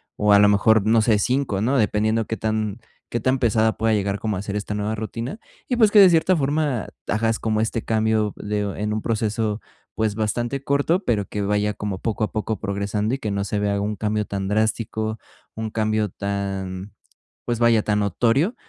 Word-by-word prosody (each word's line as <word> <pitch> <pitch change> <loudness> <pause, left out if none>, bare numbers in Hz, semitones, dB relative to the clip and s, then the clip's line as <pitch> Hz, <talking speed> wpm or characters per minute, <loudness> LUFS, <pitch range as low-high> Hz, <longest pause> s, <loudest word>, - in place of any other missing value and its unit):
o 105 0 +2
a 100 - +7
lo 105 - +6
mejor, 105 +1 +4
no 115 0 +4
sé, 110 -1 +3
5, 125 -2 0
¿no?, 130 +5 +2
dependiendo 110 0 +1
que 110 - -4
tan 110 0 -2 0.3
que 120 - -2
tan 130 +2 +1
pesada 110 -2 +2
pueda 110 0 +1
llegar 100 -1 0
como 110 -4 -2
a - - -3
ser 100 0 -5
esta 105 0 -3
nueva 105 +1 -2
rutina, 115 - -5 0.3
y 250 - 0
pues, 220 -3 +4
que 210 - +7
de 195 - +9
cierta 170 +1 +3
forma 145 -5 0 0.2
hagas 110 +2 0
como 110 -1 0
este 110 +1 -1
cambio 110 -1 +1
de 105 0 -3 0.2
en 105 0 -2
un 110 - -2
proceso, 110 -1 -1 0.4
pues, 110 -2 0
bastante 120 +5 -2
corto, 145 +7 +1
pero 110 - 0
que 105 - -4
vaya 105 +1 0
como 100 -2 -4
poco 110 -1 -2
a - - -1
poco 110 0 -2
progresando, 105 +2 -1
y - - -5
que 110 - -3
no 100 0 -1
se 105 +1 -2
vea 100 -1 0
un 105 0 -2
cambio 105 0 0
tan 100 -1 -4
drástico, 110 +1 -1 0.4
un 110 0 -3
cambio 110 -1 0
tan, 95 -1 -4 0.5
pues 120 -1 -1
vaya, 115 -2 +4
tan 105 -1 +1
notorio. 120 - +1
110 Hz, 200 wpm, -22 LUFS, 105-115 Hz, 0.5 s, de